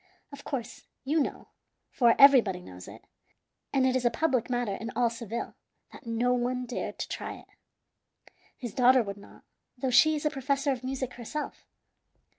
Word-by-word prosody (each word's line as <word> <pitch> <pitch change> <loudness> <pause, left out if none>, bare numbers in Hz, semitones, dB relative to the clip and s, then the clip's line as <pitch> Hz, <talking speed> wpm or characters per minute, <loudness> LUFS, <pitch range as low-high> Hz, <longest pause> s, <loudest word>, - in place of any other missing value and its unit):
Of 280 0 -11
course, 250 -6 -6 0.2
you 305 +4 +1
know, 285 - -3 0.4
for 235 -3 +4
everybody 250 -10 +6
knows 90 - -12
it, - - -12 0.7
and 265 -2 +2
it 260 0 +2
is 255 - 0
a 240 - +4
public 255 -1 0
matter 245 -4 -1
in 225 +4 -5
all 235 -1 +2
Seville, 230 -1 -5 0.4
that 260 - -13
no 235 +2 +1
one 250 +1 -1
dared 245 - -5
to - - -4
try - - -5
it. - - -16 1.1
His 240 -6 -6
daughter 255 0 +5
would 200 -1 -6
not, 200 - -16 0.3
though 255 +1 -1
she 310 +5 +6
is 300 - -4
a 300 - +2
professor 275 0 0
of 255 -2 -4
music 260 -1 -3
herself. 250 +6 -6
250 Hz, 175 wpm, -28 LUFS, 235-270 Hz, 1.1 s, everybody